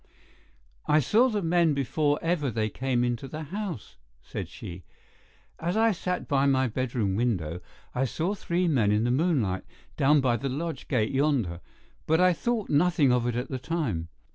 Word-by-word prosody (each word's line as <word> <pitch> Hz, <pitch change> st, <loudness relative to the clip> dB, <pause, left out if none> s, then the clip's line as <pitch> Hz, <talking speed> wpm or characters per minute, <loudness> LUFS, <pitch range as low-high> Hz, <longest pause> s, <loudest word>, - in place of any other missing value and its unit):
"I 150 Hz, -, +5 dB
saw 225 Hz, -, +4 dB
the 210 Hz, -4 st, -1 dB
men 165 Hz, -2 st, +3 dB
before 145 Hz, +2 st, +1 dB
ever 165 Hz, -4 st, 0 dB
they 110 Hz, -1 st, -1 dB
came 125 Hz, 0 st, 0 dB
into 120 Hz, +2 st, -2 dB
the 155 Hz, +4 st, -6 dB
house," 180 Hz, -, -6 dB, 0.3 s
said -, -, -6 dB
she. 85 Hz, +1 st, -9 dB, 0.8 s
"As 175 Hz, +5 st, -1 dB
I 225 Hz, 0 st, +4 dB
sat 180 Hz, -1 st, -3 dB
by 140 Hz, 0 st, +2 dB
my 130 Hz, -1 st, +3 dB
bedroom 115 Hz, -5 st, -1 dB
window 90 Hz, -8 st, -1 dB, 0.3 s
I 130 Hz, -, +1 dB
saw 165 Hz, +9 st, -1 dB
three 180 Hz, -2 st, -1 dB
men 120 Hz, -10 st, +2 dB
in 105 Hz, +1 st, +2 dB
the 120 Hz, -, +1 dB
moonlight 130 Hz, -, +1 dB, 0.3 s
down 145 Hz, +2 st, +4 dB
by 125 Hz, -3 st, +2 dB
the 135 Hz, -, -3 dB
lodge 150 Hz, +1 st, -4 dB
gate 110 Hz, -6 st, +1 dB
yonder, 130 Hz, -, +1 dB, 0.5 s
but 160 Hz, +1 st, +3 dB
I 180 Hz, 0 st, +5 dB
thought 230 Hz, +3 st, -1 dB
nothing 150 Hz, -2 st, +3 dB
of 125 Hz, -1 st, +2 dB
it 120 Hz, -, -1 dB
at 125 Hz, +2 st, -3 dB
the 130 Hz, -, -3 dB
time. 125 Hz, -, -2 dB
140 Hz, 175 wpm, -27 LUFS, 120-170 Hz, 0.8 s, I